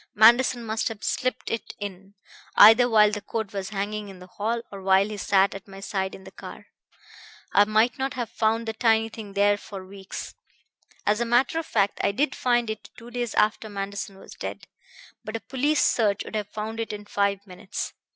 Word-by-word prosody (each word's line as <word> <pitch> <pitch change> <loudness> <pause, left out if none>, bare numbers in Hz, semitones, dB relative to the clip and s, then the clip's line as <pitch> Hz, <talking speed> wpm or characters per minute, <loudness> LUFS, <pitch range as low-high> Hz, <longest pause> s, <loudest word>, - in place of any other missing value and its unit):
Manderson 240 +2 +5
must 220 0 -1
have 220 -2 -6
slipped 255 0 -1
it 230 - -4
in, 195 0 -8 0.4
either 225 +4 +8
while 210 -2 +6
the 210 -1 -3
coat 220 -1 -4
was 195 -1 -4
hanging 210 0 -3
in 190 - -11
the 180 - -12
hall 225 +5 -3
or 200 -1 -8
while 190 +1 +4
he 215 - -5
sat 195 0 +3
at 195 +1 -9
my 195 0 -11
side 190 -1 -3
in 190 - -13
the 190 - -12
car. - - -10 0.9
I 205 - +6
might 220 +4 +2
not 270 0 -2
have 240 -3 -4
found 225 +1 0
the 225 - -2
tiny 225 0 +2
thing 220 -3 -9
there 205 +1 +3
for 195 -2 -9
weeks 190 0 -8 0.7
as 210 +3 +2
a - - +4
matter 245 +6 +2
of 325 - -6
fact 200 -2 +1
I - - +2
did 270 +5 +1
find 240 -2 +1
it 215 -2 -8
two 240 0 -11
days 240 -1 -3
after 215 +1 +2
Manderson 200 0 -5
was - - -12
dead - - -6 0.6
but 215 - -6
a - - -2
police 280 +5 +1
search 210 -4 +2
would - - -9
have 210 -1 -2
found 220 +1 -5
it 225 - -2
in 210 0 -7
five 200 -1 0
minutes. 185 -1 -6
215 Hz, 205 wpm, -25 LUFS, 200-230 Hz, 0.9 s, either